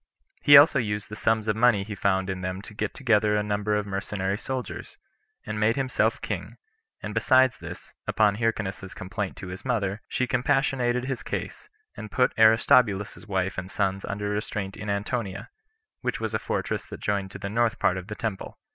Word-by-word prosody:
He 145 -1 +9
also 140 -1 +7
used 105 -3 -2
the 105 - -6
sums 110 0 +1
of 105 - +1
money 110 -3 +4
he 105 +1 -6
found 95 -1 +1
in 95 -1 -3
them 95 +1 -4
to 110 - -11
get 105 0 -3
together 105 -5 +2
a 105 - +1
number 105 0 0
of 105 0 0
mercenary 100 0 -2
soldiers, 125 +1 -5 0.5
and 105 0 -4
made 110 +2 +3
himself 135 -2 +1
king; - - -5 0.5
and - - -4
besides 130 -1 +4
this, - - -9
upon 105 -2 +3
Hyrcanus's 105 -4 -2
complaint 95 +1 -4
to 95 - -7
his 90 +1 -8
mother, 105 -5 -1
she 125 - 0
compassionated 125 -1 +1
his 130 -2 -3
case, - - -5 0.3
and 110 - -7
put 125 +4 +2
Aristobulus's 110 -2 +4
wife 95 -2 -1
and 90 +1 -7
sons 95 -1 -1
under 100 +1 -3
restraint 105 -1 -3
in 105 - -6
Antonia, 100 - -3 0.5
which - - -2
was - - -3
a - - +1
fortress - - -3
that - - -8
joined 100 -2 -1
to - - -9
the - - -5
north 115 +2 +1
part 90 - +2
of 95 0 -6
the 105 - -5
temple. 110 -4 -4
105 Hz, 190 wpm, -26 LUFS, 100-120 Hz, 0.5 s, He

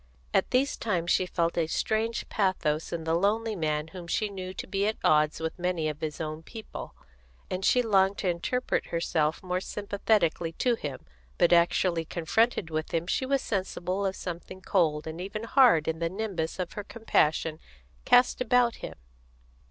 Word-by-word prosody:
At - - +2
these 265 +3 +1
times 175 -6 -1
she 185 - +2
felt 170 -1 0
a 160 - +1
strange 220 +7 -1
pathos 185 -6 0
in 170 -1 -3
the 160 0 0
lonely 215 +5 +1
man 155 -2 -1
whom 175 0 -9
she 210 +4 0
knew 185 -2 -6
to 190 - -6
be 200 +1 0
at 220 - -1
odds 150 0 +3
with 160 +2 -4
many 175 -3 0
of 150 0 -4
his 155 -2 -4
own 155 0 -4
people, 220 +6 -9 0.6
and 185 +1 -2
she 250 +4 +4
longed 195 -2 +3
to 195 - -2
interpret 180 +9 -1
herself 165 -1 0
more 180 0 -1
sympathetically 200 -5 0
to 245 +8 +1
him, 145 - -5 0.4
but 175 - +4
actually 170 0 +3
confronted 175 +3 0
with 155 +1 -2
him 165 0 0
she 260 +8 -1
was 275 0 +1
sensible 190 -1 -2
of 190 -1 -1
something 180 +1 -7
cold 160 -6 +1
and 160 +2 -6
even 205 +4 -5
hard 230 - +5
in 160 0 -1
the 165 0 0
nimbus 190 -4 -3
her 185 - -1 0.2
compassion 160 -8 0 0.4
cast 245 +1 +4
about 245 -1 +3
him. - - -7
180 Hz, 175 wpm, -28 LUFS, 160-215 Hz, 0.6 s, hard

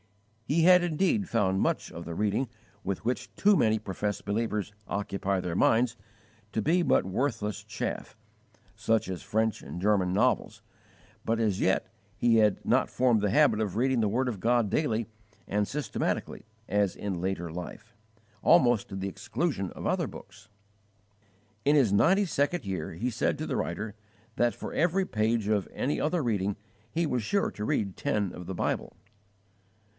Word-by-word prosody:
He 160 +5 +2
had 180 +1 +7
indeed 185 +4 +1
found 95 -4 +1
much - - 0
of 85 - -7
the 85 - -5
reading 105 +6 0 0.3
with 100 +2 -3
which 125 +2 -2
too 205 +1 +4
many 110 -9 +3
professed 105 0 -4
believers 105 -1 -1
occupy 100 0 -1
their 90 -2 -3
minds 115 +4 +3 0.6
to 110 - -1
be 170 - +3
but 140 - +3
worthless 105 0 -2
chaff - - -5 0.6
such 115 -3 +1
as 95 -2 -4
French 110 0 0
and - - -7
German 95 -2 +2
novels; 95 - +1 0.6
but 115 0 0
as 105 -4 +1
yet 95 - +2 0.3
he 115 0 +4
had 105 -3 +2
not - - +2
formed 120 -4 +2
the 105 - +1
habit 115 -2 +4
of 105 -2 -2
reading 130 0 +2
the 105 - +2
word 125 +5 0
of 115 -6 -3
God 120 +1 +2
daily 115 -3 0 0.4
and 105 0 0
systematically 145 -5 -3 0.2
as 100 -1 +1
in 95 -4 -4
later 90 -2 -2
life, 105 +7 -8 0.5
almost 120 -4 +4
to - - -6
the 95 0 -3
exclusion 100 - -2
of - - -8
other - - +1
books. 110 - -12 1.1
In 145 +2 +4
his 125 -9 +4
ninety 190 - +4
second 155 - 0
year, 90 -5 -4
he 120 +9 -2
said 110 - 0
to - - -4
the - - -2
writer, 100 +5 -3 0.4
that 120 -1 +2
for - - -7
every 180 +3 +2
page 110 - 0
of 105 -3 +1
any 140 - -1
other 160 +1 +1
reading 100 -4 0 0.3
he 170 +7 0
was 125 -5 0
sure 200 - 0
he - - -8
read 100 -2 -1
ten 105 -9 -1
of 90 - -9
the 95 - -4
Bible. - - -2
110 Hz, 170 wpm, -28 LUFS, 100-130 Hz, 1.1 s, had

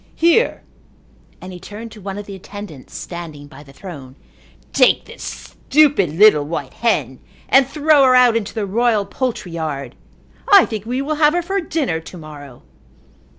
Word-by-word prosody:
"Here," 340 +9 +2 0.8
and 185 0 -9
he 180 - -9
turned 210 +5 -9
to 215 - -13
one 195 +1 -6
of 205 - -7
the 200 - -9
attendants 190 -6 -10
standing 165 -5 -8
by 145 - -14
the 140 -2 -16
throne, 135 -4 -10 0.6
"take - - +4
this - - -13
stupid, 275 - +1
little 205 -7 +6
white 145 -3 -5
hen 145 - -1 0.3
and 270 -1 +5
throw 300 0 +3
her 255 -1 +5
out 250 -2 +5
into 220 -1 -3
the 215 -2 -2
royal 220 0 +1
poultry 225 -3 -4
yard. 155 -4 -5 0.6
I 400 -2 +8
think 220 -1 -6
we 255 +3 -2
will 305 +1 -2
have 300 +2 +5
her 350 - 0
for 390 +3 -1
dinner 295 - -2
to 165 +3 -11
morrow." 145 -5 -12
205 Hz, 170 wpm, -19 LUFS, 160-260 Hz, 0.8 s, I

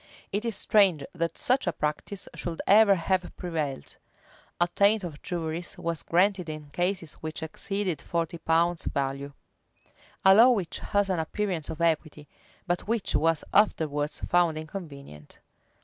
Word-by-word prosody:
[v] 200 - +1
It 220 - -11
is 230 -3 -1
strange 195 -8 +3
that 165 0 -2
such 255 -4 +1
a - - +3
practice 160 +6 -4
should 170 -2 -5
ever 205 0 +6
have 185 +1 -1
prevailed. 155 -6 -4 0.6
Attaint 200 +4 +3
of 155 -4 -7
juries 170 -1 -4
was 170 -1 -3
granted 180 0 +1
in 150 -2 -8
cases 175 -1 -1
which 160 +1 -5
exceeded 180 0 -3
forty 170 0 -3
pounds' 165 +1 +1
value; 140 +1 -2 0.5
[v*] - - -30 0.3
a 190 - +9
law 230 +5 +8
which 200 -9 0
has 205 -1 0
an 180 - 0
appearance 170 0 -2
of 160 0 -6
equity, 155 -2 0 0.4
but 175 0 -2
which 225 -2 -1
was 160 0 +2
afterwards 150 -8 +1
found 175 -3 +2
inconvenient. 145 - -9
170 Hz, 150 wpm, -27 LUFS, 155-195 Hz, 0.6 s, a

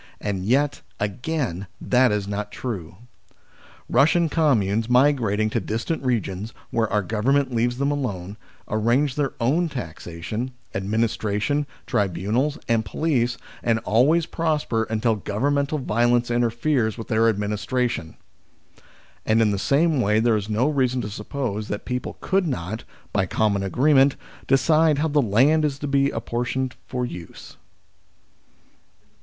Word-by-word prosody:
And 100 -3 -3
yet, 140 +6 +1 0.2
again, 105 - -2
that 125 -1 +3
is 105 -1 -1
not 105 +1 -4
true: 95 -10 -5 0.9
Eussian 160 +5 +3
communes 115 - +2
migrating 125 -5 +3
to - - +1
distant 120 +9 -3
regions, 110 -4 -2 0.2
where 115 -2 +1
our 105 0 +1
Government 130 +7 +1
leaves 120 +1 +1
them 140 +2 +1
alone, 100 -9 -3 0.3
arrange 120 +6 +1
their 140 -1 -1
own 155 +9 +2
taxation, 105 - -5 0.2
administration, 110 +6 0 0.2
tribunals, 105 - 0
and 115 -1 +2
police, 125 -4 0 0.2
and 115 -1 +2
always 150 +9 +3
prosper 150 -10 -1
until 110 0 +1
governmental 140 +9 0
violence 120 -1 +1
interferes 120 0 +1
with 115 - -7
their 115 +1 +3
administration. 105 -2 -2 1.1
And 110 +1 +2
in 110 -2 +3
the 100 - -1
same 145 - +2
way 105 0 +3
there 115 0 +3
is 105 0 -3
no 110 +6 +2
reason 130 -4 +1
to 105 -2 -5
suppose 105 -1 -4
that 105 - -4
people 125 0 -4
could 190 -2 +1
not, 110 - -4 0.3
by 95 -2 +1
common 100 0 +1
agree 125 +10 +2
ment, 135 0 +5 0.3
decide 155 +3 +4
how 160 +2 +1
the 145 0 +3
land 135 +8 +3
is 145 -2 0
to 145 - -4
be 140 0 +2
apportioned 125 +1 -2
for 125 -1 -2
use. 85 -8 -9
120 Hz, 135 wpm, -23 LUFS, 105-140 Hz, 1.1 s, ment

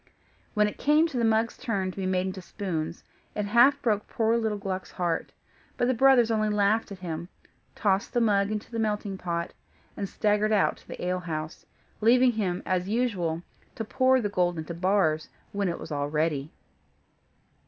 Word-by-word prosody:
When 210 0 +4
it 210 - -7
came 300 +3 +4
to 265 - -4
the - - +1
mug's 225 +1 +2
turn 195 -5 -1
to - - -15
be 190 -1 -2
made 185 0 +1
into 190 0 -4
spoons, 170 -4 -4 0.3
it 210 - -1
half 240 +7 +5
broke 210 -4 +1
poor 225 0 +1
little 220 -2 0
Gluck's 190 -2 -4
heart: 175 -2 -2 0.5
but 245 - +2
the 255 - +3
brothers 245 -2 +5
only 215 -1 +1
laughed 210 +1 +1
at 200 - -6
him, 165 +1 -4 0.5
tossed 200 0 +1
the 245 - +3
mug 200 -3 +3
into 215 +1 -4
the 230 - -3
melting 210 -2 -1
pot, 170 -1 -3 0.4
and 200 -2 -4
staggered 210 0 +1
out 210 -2 +2
to - - -21
the - - -6
ale 180 0 0
house: 160 -3 -5 0.3
leaving 245 +3 +5
him, 195 -6 -2
as 185 0 0
usual, 190 -8 0 0.3
to 225 - -4
pour 260 +3 +3
the 220 - 0
gold 180 -3 0
into 160 +1 -5
bars, 170 -3 +1 0.2
when 200 -2 -1
it 170 - -3
was - - -9
all 145 -1 -1
ready. 150 -1 -1
200 Hz, 185 wpm, -27 LUFS, 180-225 Hz, 0.5 s, half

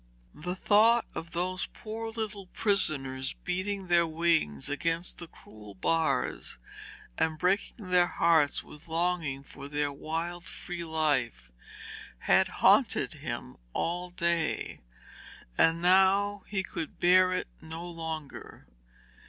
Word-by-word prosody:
The 180 +4 -5
thought 220 +4 +5
of 165 - -6
those 180 +2 -2
poor 225 0 -6
little 215 -3 -4
prisoners 140 -10 0
beating 190 +2 -2
their 170 -1 +4
wings 160 - +1
against 165 +4 -1
the 170 - -6
cruel 105 -9 -14
bars 155 +8 0 0.6
and 160 -1 +1
breaking 190 +2 -1
their 180 -1 +5
hearts 160 -5 +2
with 150 +3 -11
longing 165 -4 -1
for 140 - -10
their 145 0 -1
wild 165 +4 -4
free 175 -1 -6
life, 145 - 0 0.7
had - - +3
haunted - - +3
him - - -6 0.2
all 175 +2 -2
day, 170 -2 -1 0.7
and 165 - +3
now 195 +2 +4
he 195 -2 -2
could 165 -4 -6
bear 185 +1 +5
it 185 - -1
no 160 +2 -7
longer. 160 -4 -7
170 Hz, 120 wpm, -29 LUFS, 155-185 Hz, 0.7 s, thought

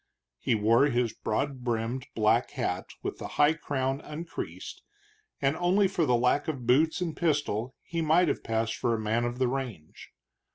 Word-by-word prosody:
He 120 - +1
wore 115 +6 +4
his 120 -4 0
broad 130 +4 -2
brimmed 120 +2 -2
black 110 +2 +3
hat 105 -9 -2 0.2
with - - -4
the - - -5
high 145 +2 +5
crown 135 -3 -2
uncreased, 165 +3 -7 0.6
and 140 +2 +1
only 185 +3 +3
for 175 -5 0
the 125 - +4
lack 125 +4 +2
of 135 -6 -3
boots 155 +8 +3
and 170 -3 -2
pistol 140 -7 0
he 165 0 -3
might 165 +3 +4
have - - -1
passed 115 0 -1
for 115 0 +1
a - - -3
man 110 +2 0
of 120 +1 -3
the 130 0 +2
range. 120 - -5
130 Hz, 175 wpm, -28 LUFS, 115-150 Hz, 0.6 s, high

